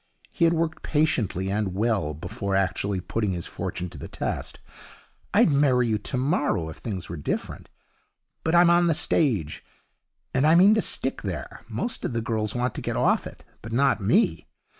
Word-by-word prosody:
He 170 Hz, -, +2 dB
had 165 Hz, +1 st, +3 dB
worked 160 Hz, -1 st, -1 dB
patiently 110 Hz, -, 0 dB
and 100 Hz, -2 st, -1 dB
well 100 Hz, -8 st, 0 dB
before 95 Hz, +5 st, -3 dB
actually 95 Hz, +1 st, 0 dB
putting 105 Hz, +1 st, -2 dB
his 85 Hz, -1 st, -4 dB
fortune 90 Hz, -, -4 dB
to 80 Hz, -, -10 dB
the -, -, -7 dB
test. -, -, -4 dB, 0.7 s
'I'd -, -, +4 dB
marry 135 Hz, -4 st, +3 dB
you 110 Hz, -1 st, +1 dB
tomorrow 130 Hz, -, -1 dB
if 80 Hz, -, -9 dB
things 95 Hz, -6 st, -5 dB
were 85 Hz, -, -6 dB
different. 75 Hz, -, -4 dB, 0.7 s
But 160 Hz, +1 st, +1 dB
I'm 170 Hz, 0 st, +6 dB
on 175 Hz, 0 st, +4 dB
the 165 Hz, -, +2 dB
stage, 125 Hz, -, 0 dB, 0.7 s
and 140 Hz, -, +3 dB
I 160 Hz, -, +6 dB
mean 190 Hz, +5 st, +7 dB
to 220 Hz, -, +2 dB
stick -, -, -1 dB
there. -, -, -6 dB
Most 235 Hz, -, -2 dB
of -, -, -2 dB
the 115 Hz, -, -1 dB
girls 110 Hz, -1 st, -2 dB
want 125 Hz, -1 st, 0 dB
to -, -, -5 dB
get -, -, -3 dB
off -, -, +2 dB
it, -, -, -13 dB, 0.2 s
but 115 Hz, -, -8 dB
not 135 Hz, -2 st, +2 dB
me. 85 Hz, -6 st, +2 dB
115 Hz, 185 wpm, -25 LUFS, 95-150 Hz, 0.7 s, mean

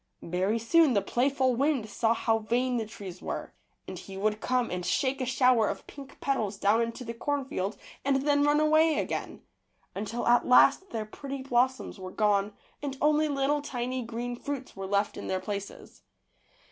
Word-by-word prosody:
Very 185 Hz, +6 st, 0 dB
soon 285 Hz, +5 st, +4 dB
the 200 Hz, -, +3 dB
playful 260 Hz, +3 st, +1 dB
wind 270 Hz, -3 st, +1 dB
saw 225 Hz, +2 st, +1 dB
how 225 Hz, -1 st, +1 dB
vain 245 Hz, +3 st, 0 dB
the 220 Hz, -2 st, -2 dB
trees 190 Hz, -4 st, -9 dB
were, -, -, -5 dB, 0.3 s
and -, -, -6 dB
he 195 Hz, -1 st, -9 dB
would 210 Hz, +2 st, 0 dB
come 250 Hz, -1 st, 0 dB
and 180 Hz, 0 st, -3 dB
shake 270 Hz, +6 st, 0 dB
a 255 Hz, -, -1 dB
shower 250 Hz, -3 st, +3 dB
of -, -, -5 dB
pink 275 Hz, -2 st, -12 dB
petals 220 Hz, -8 st, -1 dB
down 210 Hz, +4 st, +3 dB
into 230 Hz, +2 st, -3 dB
the 230 Hz, -, -4 dB
cornfield 265 Hz, -5 st, -2 dB, 0.3 s
and 270 Hz, -1 st, +1 dB
then 285 Hz, -1 st, +4 dB
run 295 Hz, +1 st, +4 dB
away 310 Hz, 0 st, +4 dB
again, -, -, -3 dB, 0.5 s
until 215 Hz, +4 st, -4 dB
at 240 Hz, 0 st, +4 dB
last 275 Hz, +9 st, +5 dB
their 220 Hz, -6 st, -3 dB
pretty 275 Hz, +4 st, -7 dB
blossoms 255 Hz, -3 st, 0 dB
were 185 Hz, 0 st, -6 dB
gone 205 Hz, 0 st, +1 dB, 0.3 s
and 275 Hz, -2 st, -4 dB
only 305 Hz, +1 st, +3 dB
little 285 Hz, 0 st, 0 dB
tiny 255 Hz, -2 st, -3 dB
green 240 Hz, +1 st, -4 dB
fruits 270 Hz, +1 st, -6 dB
were 195 Hz, 0 st, -5 dB
left 200 Hz, +1 st, 0 dB
in -, -, -6 dB
their 190 Hz, -, -1 dB
places. 200 Hz, +1 st, -7 dB
245 Hz, 180 wpm, -28 LUFS, 215-275 Hz, 0.5 s, last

